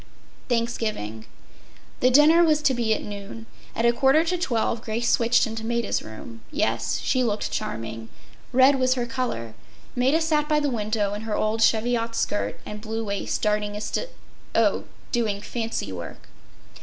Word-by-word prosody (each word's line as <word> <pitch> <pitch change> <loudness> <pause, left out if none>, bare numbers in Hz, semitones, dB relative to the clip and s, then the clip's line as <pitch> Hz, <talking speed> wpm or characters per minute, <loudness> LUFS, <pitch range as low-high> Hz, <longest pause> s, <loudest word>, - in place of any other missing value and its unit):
” - - -29
Thanksgiving. 215 - -2 0.7
The 255 - +4
dinner 300 +6 +6
was 305 -2 +3
to 270 - +4
be 235 -3 0
at - - -5
noon. 205 +2 -8 0.3
At 230 - 0
a 235 - +5
quarter 270 +6 +4
to 345 +2 0
twelve 235 -9 0
Grace 230 +1 -1
switched 235 +1 +3
into 225 0 -5
Maida’s 235 -1 -1
room. 110 +1 -10
Yes, 115 +1 0
she 255 -1 +2
looked 215 -3 -1
charming. 115 0 -4 0.4
Red 260 +2 +5
was 255 0 +3
her 245 -2 -1
color. 235 - -3 0.4
Maida 260 +6 +3
sat 305 -2 +1
by 300 -1 +3
the 290 -2 0
window 210 -3 -1
in 205 - -4
her 220 -1 -2
old 215 +1 0
cheviot 230 +1 +2
skirt 205 -2 -1
and 210 0 -7
blue 225 +1 -3
waist 200 -1 -2
darning 210 -1 0
a 210 - -5
st—. 360 - -3 0.5
Oh, - - +2 0.3
doing 220 -5 0
fancy 225 - -4
work. 85 -3 -8
230 Hz, 170 wpm, -25 LUFS, 210-255 Hz, 0.7 s, dinner